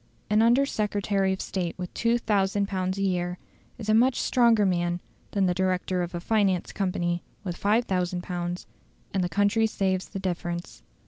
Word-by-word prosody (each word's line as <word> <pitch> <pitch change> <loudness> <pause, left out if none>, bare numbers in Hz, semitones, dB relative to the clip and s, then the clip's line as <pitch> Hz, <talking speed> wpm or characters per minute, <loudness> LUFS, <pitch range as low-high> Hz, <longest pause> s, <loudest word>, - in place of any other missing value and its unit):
An 215 +1 +5
Under 240 +4 +5
Secretary 205 -5 0
of 190 - -2
State 175 -3 -3
with 180 -1 -6
2000 205 -4 +1
pounds 185 -1 -2
a 195 - -1
year 180 -2 0 0.4
is 220 -3 -7
a 215 - +3
much 245 +3 +4
stronger 235 -4 +4
man 175 -1 +1 0.3
than 200 -2 +1
the 180 - +2
director 185 0 0
of 175 0 -4
a - - -2
finance 195 -2 +1
company 175 -3 -1 0.2
with 180 -4 -3
5000 185 -5 0
pounds, 175 0 -4 0.5
and 190 -2 +1
the 175 - -1
country 205 +4 +3
saves 190 -3 -1
the 200 - -6
difference. 175 - -4
190 Hz, 170 wpm, -27 LUFS, 180-210 Hz, 0.5 s, An